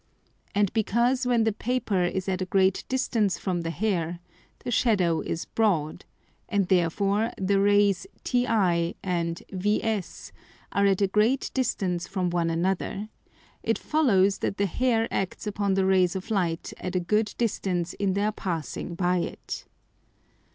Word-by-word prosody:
And 205 -2 +2
because 235 +4 +1
when 240 -2 +3
the 220 -1 +1
Paper 215 -6 0
is 190 +2 -2
at 190 -1 -1
a 185 - -2
great 190 0 +2
distance 230 -6 +1
from 180 -2 -2
the 165 - -3
Hair, 175 -2 -1 0.5
the - - -3
Shadow 190 -9 +2
is 165 - -3
broad, 175 -7 0 0.4
and 200 -3 +1
therefore 195 +5 +2
the 195 +1 +1
Rays 200 -2 +3 0.2
TI 200 -9 +1
and 170 -2 -2
VS 210 +1 -2 0.4
are 200 0 +3
at 195 0 +2
a - - +4
great 215 +7 +1
distance 190 -9 -1
from 185 -3 -1
one 170 -1 +1
another, 190 +5 -1 0.5
it - - 0
follows 200 -11 +2
that - - -2
the 200 - +2
Hair 225 +3 +1
acts 195 +2 -2
upon 205 -2 0
the 195 -1 +2
Rays 185 -2 +3
of 190 +3 -5
Light 175 -5 -1
at 185 0 -4
a - - +3
good 210 +4 0
distance 185 -6 -1
in 195 -2 0
their 205 +2 +1
passing 170 - -4
by 180 0 +1
it. - - -5
195 Hz, 150 wpm, -26 LUFS, 180-215 Hz, 0.5 s, a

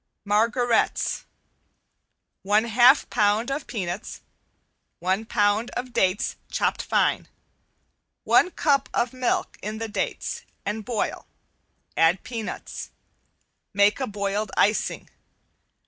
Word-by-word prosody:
~MARGARETTES~ 230 +3 +1 1.2
One 205 +3 +3
half 240 +4 +5
pound 210 +5 +2
of 275 +1 -3
peanuts, 180 -7 -5 0.8
one 190 +5 -1
pound 210 +1 +1
of 250 0 -5
dates 190 0 +1
chopped - - 0
fine. - - +1 1.0
One 360 - +4
cup 285 -5 +1
of 240 +1 0
milk 255 -1 -1
in 215 +1 -4
the 225 0 -4
dates 210 - -3 0.2
and 215 +2 -3
boil, 230 -1 -3 0.7
add 165 +3 +3
peanuts. 225 -2 -6 0.9
Make 205 +3 +4
a 265 - -1
boiled 200 0 -2
icing. 210 +1 +1
215 Hz, 100 wpm, -25 LUFS, 205-240 Hz, 1.2 s, half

